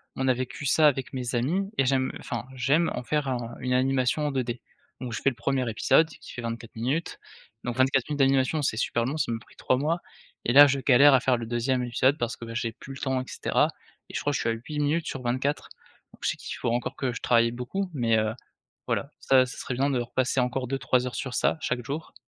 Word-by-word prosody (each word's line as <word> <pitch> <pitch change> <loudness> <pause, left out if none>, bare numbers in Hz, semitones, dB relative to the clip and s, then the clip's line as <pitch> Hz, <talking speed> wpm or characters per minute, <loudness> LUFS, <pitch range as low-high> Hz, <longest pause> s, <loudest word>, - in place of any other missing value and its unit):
on 130 0 -1
a - - +5
vécu 130 +3 -5
ça 155 +2 +5
avec 135 -2 0
mes 125 -1 -3
amis 180 +12 0
et 135 - +3
j'aime 130 0 +1
enfin, 120 0 -5
j'aime 140 +7 +2
en - - -4
faire 150 +1 -1
un 120 -2 -3
une 125 0 -1
animation 130 +3 +1
en - - -1
2D. 125 -2 -2 0.4
Donc 125 -2 -4
je - - -4
fais 135 - +4
le 125 - -8
1er 130 0 -1
épisode 160 +8 +3
qui - - -12
fait 120 - -6
24 115 0 -6
minutes. 135 +9 -2 0.5
Donc 120 -1 -2
24 130 0 +2
minutes 145 -1 -3
d'animation 135 +3 +3
c'est 110 -5 0
super 115 -1 0
long, 145 +5 -2
ça 140 -6 0
m'a 115 - -3
pris - - -20
3 130 - +1
mois 160 +5 0 0.5
et 120 - +1
là 145 +1 +10
je 140 0 0
galère 140 +2 +6
à 130 - +6
faire 130 0 +2
le 115 - -5
2e 120 +2 0
épisode, 130 +4 +2
parce 120 -2 -2
que 115 -1 -8
j'ai 115 -1 -1
plus 135 +2 -10
le - - -9
temps 130 -1 0
et - - -8
cetera - - +1 0.4
et - - -12
je - - -1
crois 145 - 0
que 140 - 0
suis - - 0
à - - +2
8 150 +6 -6
minutes 155 +3 0
sur 135 - -4
24, 130 +4 -1 0.4
donc - - -18
c'est - - 0
qu'il - - -6
faut 120 - -1
encore 120 +1 -1
que 130 -2 -1
je - - -6
travaille 115 -1 +3
beaucoup 180 +11 -3
mais, 115 -4 +2
heu, 110 0 0 0.5
voilà, - - -1
ça, 130 -1 +5
ça 125 - -9
serait 125 - -4
bien 140 +3 +1
de 130 -3 +1
repasser 130 +2 0
encore 125 +1 -1
2-3 130 -1 +1
heures 125 - -6
sur 130 -2 -4
ça, - - +1
chaque 125 -1 -2
jour. 150 +4 -5
130 Hz, 250 wpm, -27 LUFS, 120-140 Hz, 0.5 s, là